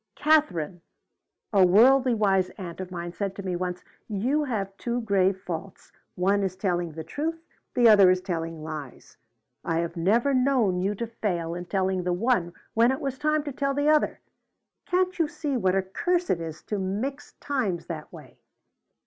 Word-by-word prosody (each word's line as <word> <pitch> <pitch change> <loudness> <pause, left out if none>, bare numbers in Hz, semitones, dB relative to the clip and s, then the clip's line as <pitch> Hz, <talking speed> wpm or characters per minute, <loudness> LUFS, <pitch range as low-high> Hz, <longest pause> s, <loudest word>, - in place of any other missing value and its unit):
"'Katherine,' 185 - +2 0.7
a 195 -2 +6
worldly 245 +7 +5
wise 195 -4 +2
aunt 175 -3 -7
of 185 - -6
mine 175 -1 -6
said 195 -1 -3
to 200 - -7
me 185 -2 -2
once, 180 0 -3 0.2
'you 250 +9 0
have 200 -7 -3
two 240 0 -2
grave 195 -3 +2
faults. 180 +1 -7 0.2
One 195 +3 +2
is 190 -2 -2
telling 175 -4 -1
the 160 +1 -6
truth. 325 - -4 0.3
The 240 -2 +6
other 200 -4 +8
is 185 0 +3
telling 165 -4 -4
lies. 155 -4 -8 0.5
I 165 - -1
have 170 0 -4
never 225 +11 +2
known 250 -8 +2
you 200 +2 0
to 235 - -3
fail 180 -7 -3
in 175 +1 -5
telling 190 0 0
the 180 0 0
one 185 -3 +1 0.2
when 230 +3 +4
it 265 - -2
was 270 -2 -3
a - - -28
time 305 0 +1
to 290 - -4
tell 275 0 -1
the 285 +1 +2
other.' 305 -1 +2 0.7
Can't 365 0 +1
you 325 - +3
see 300 -2 -3
what 190 -6 +1
a 195 - +2
curse 350 - 0
it 170 - 0
is 160 -2 -7
to 210 - -3
mix 220 +10 -3
times 235 -12 -2
that 155 -3 -7
way?" - - -13
195 Hz, 185 wpm, -26 LUFS, 180-260 Hz, 0.7 s, other